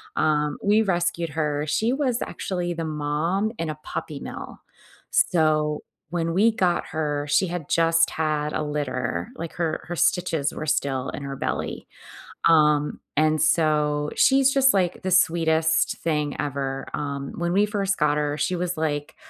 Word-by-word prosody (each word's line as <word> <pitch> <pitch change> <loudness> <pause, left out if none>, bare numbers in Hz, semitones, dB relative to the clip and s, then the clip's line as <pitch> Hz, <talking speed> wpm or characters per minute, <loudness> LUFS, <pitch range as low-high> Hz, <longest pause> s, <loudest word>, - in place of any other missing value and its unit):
Um, 150 -1 +1
we 210 +2 +4
rescued 175 -3 0
her. 150 -1 -1
She 215 +11 +1
was 260 -3 0
actually 175 -2 -3
the 165 -1 -4
mom 155 +7 -1
in 165 -1 -3
a 150 - -8
puppy 145 -2 -5
mill. - - -8 0.5
So, 155 -3 +2 0.3
when 165 -1 -1
we 220 +4 +5
got 180 -5 +1
her, 150 -2 -2
she 185 - +3
had 170 -4 -5
just 165 0 +3
had 150 -1 -1
a - - -1
litter, 130 - -3
like 165 -1 -6
her 165 -3 -2
her 175 - -4
stitches 165 -4 +1
were 155 - -5
still 135 -3 0
in 145 - -6
her 140 0 -5
belly. - - -3 0.6
Um, 150 -2 +3 0.2
and 155 0 +3
so, 150 -2 +2
she's 270 0 +4
just 270 -1 +5
like 185 -3 0
the 185 - -1
sweetest 160 -3 +3
thing 150 -3 -1
ever. 135 -2 -3
Um, 140 -2 -4
when 175 0 -1
we 200 +2 +4
first 200 -2 -1
got 150 -1 +2
her, 150 0 -1
she 180 - 0
was 180 0 -2
like 150 -1 -2
160 Hz, 160 wpm, -24 LUFS, 150-175 Hz, 0.6 s, we